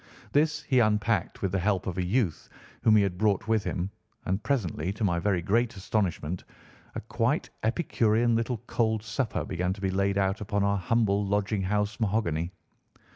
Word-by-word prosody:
This 150 +1 +2
he 130 -3 +3
unpacked 105 -3 +1
with 95 - +1
the 95 - 0
help 95 0 0
of 90 - -3
a - - +1
youth 95 -3 0 0.3
whom 110 - +5
he 105 - +5
had 90 -2 -2
brought 105 -2 +1
with 110 -2 +2
him, 90 +2 -2 0.3
and 95 +3 -1
presently, 95 - -1
to 105 - -5
my 85 -4 +2
very 95 -2 0
great 115 +5 +1
astonishment, 90 -4 -1 0.5
a - - -3
quite - - -1
epicurean 115 -2 +2
little 115 +1 0
cold 110 -2 0
supper 115 +1 -2
began 90 +1 -1
to 100 - -11
be 95 -1 0
laid 100 +1 +1
out 95 +1 +1
upon 100 -1 0
our 100 0 +2
humble 105 +1 +2
lodging 100 0 0
house 105 +2 -1
mahogany. 90 -6 0
100 Hz, 180 wpm, -28 LUFS, 95-110 Hz, 0.5 s, whom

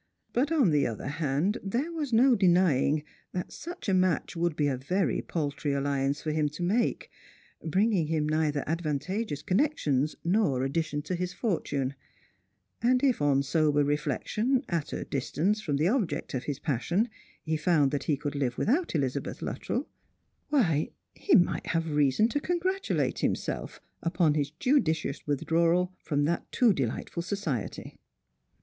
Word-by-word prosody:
But, 275 +6 +1
on 275 - +4
the 145 -2 +3
other 115 -3 -5
hand, 155 - 0
there 245 - -1
was 305 -5 -3
no 250 +3 +5
denying 175 - +3 0.3
that 180 - -4
such 345 -1 -8
a 195 - +2
match 185 -3 +1
would 170 -1 0
be 150 - +1
a 140 -2 +1
very 180 +10 0
paltry 145 -3 -2
alliance 140 0 0
for 155 - -1
him 150 -1 +1
to - - -3
make, 220 +7 0 0.5
bringing 185 0 +2
him 155 -1 0
neither 150 -2 +1
advantageous 165 +3 -2
connections 155 - +1
nor 170 - +2
addition 150 +1 -1
to 170 - -3
his 180 0 -2
fortune; 145 - -1 0.9
and 250 +3 +3
if 260 - +2
on 140 -1 +3
sober 145 0 +2
reflec 145 -1 -1
tion, 250 +5 +1
at 165 -4 -2
a - - -3
distance 175 +10 -1
from 150 -9 -1
the 155 +4 +2
object 215 -3 -1
of 130 -1 -3
his 145 -2 -2
passion, 155 - 0 0.4
he 160 0 -1
found 150 -3 +3
that 145 -2 -2
he 150 - +1
could 145 0 -4
live 135 -4 -1
without 295 - +1
Elizabeth 140 -2 -2
Luttrell, - - -3 0.6
why 175 - +2 0.2
he 400 - +2
might 180 -5 +2
have 165 -1 -1
reason 145 +7 +3
to 290 - 0
congratulate 370 +4 -1
himself - - -2 0.2
upon 165 -2 +2
his 145 -1 0
judicious 160 - 0
withdrawal 170 +5 +2 0.2
that 150 +2 0
too 240 -5 +4
delightful 135 +4 -3
society. 170 - -4
160 Hz, 155 wpm, -28 LUFS, 145-205 Hz, 0.9 s, no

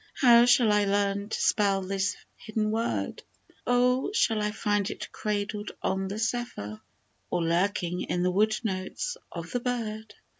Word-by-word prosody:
How 240 -2 +7
shall 245 -3 +5
I 210 0 +3
learn 200 0 0
to - - -2
spell 200 -2 +2
this 195 +1 -1 0.2
hidden 215 -1 -2
word? 115 - -2 0.5
Oh! 250 +1 +3
shall 225 - +2
I 210 - +1
find 205 -1 0
it - - -7
cradled 210 0 -3
on 190 0 0
the 200 +2 -4
zephyr? 220 - -3 0.5
Or 170 - 0
lurking 175 +1 0
in 175 - 0
the 180 - +2
wood 215 +3 +2
notes 190 -3 -3 0.2
of 170 0 -7
the 245 - 0
bird 225 -3 -4
210 Hz, 155 wpm, -28 LUFS, 190-225 Hz, 0.5 s, How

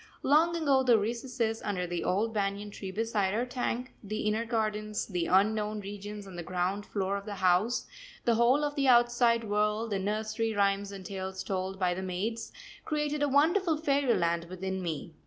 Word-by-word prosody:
Long 320 +5 +4
ago 285 -5 +3
the 245 -3 +5
recesses 230 +1 -2
under 190 -4 -2
the 175 -1 -3
old 215 +5 0
banyan 205 0 -2
tree 195 -1 -7
beside 210 -1 0
our 240 +3 0
tank, 250 0 -3
the 215 +1 -3
inner 215 +2 0
gardens, 215 -2 -1
the 180 -4 -2
unknown 210 +2 +2
regions 205 +1 -7
on 190 -2 -10
the 175 - -4
ground 185 +4 -2
floor 195 -1 -1
of 200 - -8
the 205 - -4
house, 190 +5 +2 0.4
the 235 - +4
whole 240 +6 +4
of 290 0 -1
the 280 -2 +1
outside 240 -1 +4
world, 210 +1 0
the 200 - 0
nursery 215 +2 -1
rhymes 200 0 +1
and 195 -2 -9
tales 190 0 -5
told 190 0 -3
by 180 -2 +1
the 185 - -4
maids, 195 +5 -3 0.3
created 300 -1 -1
a 290 - +2
wonderful 320 +4 +3
fairyland 250 - +1
within 190 +2 -4
me. 165 -1 -4
210 Hz, 180 wpm, -30 LUFS, 190-240 Hz, 0.4 s, the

